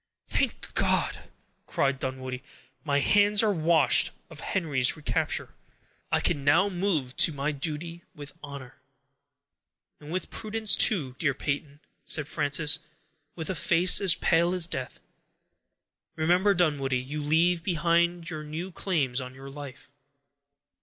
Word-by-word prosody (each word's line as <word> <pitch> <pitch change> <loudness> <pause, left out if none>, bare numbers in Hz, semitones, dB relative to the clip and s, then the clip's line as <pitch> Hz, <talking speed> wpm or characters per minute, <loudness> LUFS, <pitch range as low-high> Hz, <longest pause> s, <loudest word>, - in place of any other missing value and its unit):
"Thank - - -2
God!" - - 0 0.4
cried 135 -1 0
Dunwoodie, 130 -1 -5 0.4
"my 145 -2 +1
hands 205 +7 +4
are 210 -2 +2
washed 165 -1 +4 0.2
of 155 - -10
Henry's 145 -8 0
recapture; 150 - -2 0.6
I - - +3
can 140 - -1
now 160 +8 +4
move 175 -9 -1
to - - +4
my 140 0 -2
duty 160 +4 -4
with 145 -1 -10
honor." 140 -3 -10 1.2
"And 150 +1 -11
with 185 +2 -4
prudence, 220 -1 -2
too, 145 - +2
dear 145 -5 +1
Peyton," 145 +1 -4 0.2
said 150 -2 +2
Frances, 150 0 +1 0.6
with 165 +2 -4
a - - -1
face 170 +3 +4
as 190 -4 +5
pale 170 +2 +2
as 180 -2 +4
death. 130 -6 -6 1.2
"Remember, 180 +5 +2
Dunwoodie, 145 -7 +1
you 140 +4 -5
leave 165 +4 +2
behind 170 0 +1
you 155 -3 -5
new 160 +5 -6
claims 145 -9 -1
on 130 0 -9
your 135 +1 -10
life." 140 -1 -10
155 Hz, 135 wpm, -27 LUFS, 140-175 Hz, 1.2 s, as